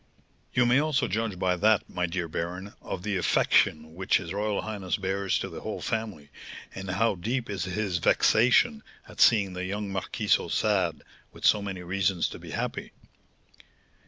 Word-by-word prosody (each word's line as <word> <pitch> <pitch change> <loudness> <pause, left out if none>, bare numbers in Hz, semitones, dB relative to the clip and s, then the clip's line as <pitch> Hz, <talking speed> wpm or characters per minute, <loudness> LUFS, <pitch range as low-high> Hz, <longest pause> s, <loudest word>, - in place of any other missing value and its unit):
"You 125 - +4
may 125 +3 +4
also 150 -2 +1
judge 110 -3 -2
by 90 0 +1
that, 105 +2 +3
my 90 -1 -2
dear 85 0 -3
baron, 90 +5 -5
of 90 - -6
the 105 -2 -1
affection 80 -3 +2
which 95 +3 +2
his 85 -1 -6
royal 105 0 -1
highness 100 -4 -3
bears 95 0 -1
to - - -3
the - - -8
whole - - -5
family, 105 -11 -4 0.4
and 95 -1 -7
how 100 +5 +2
deep 115 +5 -3
is 95 -4 -3
his 95 -1 -2
vexation 125 - +3 0.3
at - - -7
seeing 100 -5 +5
the 90 0 -4
young 100 +2 -3
marquis 95 -1 -4
so - - +4
sad, 95 -6 0 0.3
with - - -7
so 105 - +5
many 95 -3 -5
reasons 95 0 0
to - - -9
be - - -11
happy." - - -4
95 Hz, 175 wpm, -27 LUFS, 90-110 Hz, 0.4 s, seeing